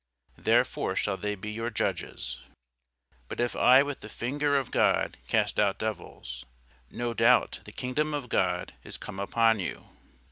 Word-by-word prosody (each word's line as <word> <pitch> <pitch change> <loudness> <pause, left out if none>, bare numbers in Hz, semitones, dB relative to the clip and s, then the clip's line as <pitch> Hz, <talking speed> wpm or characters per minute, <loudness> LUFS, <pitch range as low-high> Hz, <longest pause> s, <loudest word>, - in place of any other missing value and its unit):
therefore - - +2
shall 105 - +1
they 105 +1 -3
be 105 +2 -6
your 115 +2 -3
judges. 115 - -3 0.9
But - - -6
if 120 -2 0
I 130 +2 +7
with 145 -1 -5
the 105 - -10
finger 145 +6 0
of 135 -3 -2
God - - +2
cast 105 +2 +1
out 100 -2 +3
devils, 75 - -5 0.5
no 120 -1 -3
doubt 115 +2 +4
the - - -9
kingdom 150 +4 -1
of 140 -4 -4
God 90 -5 0
is - - -7
come 100 -2 -7
upon 115 +2 +3
you. 90 - -5
115 Hz, 155 wpm, -28 LUFS, 105-125 Hz, 0.9 s, I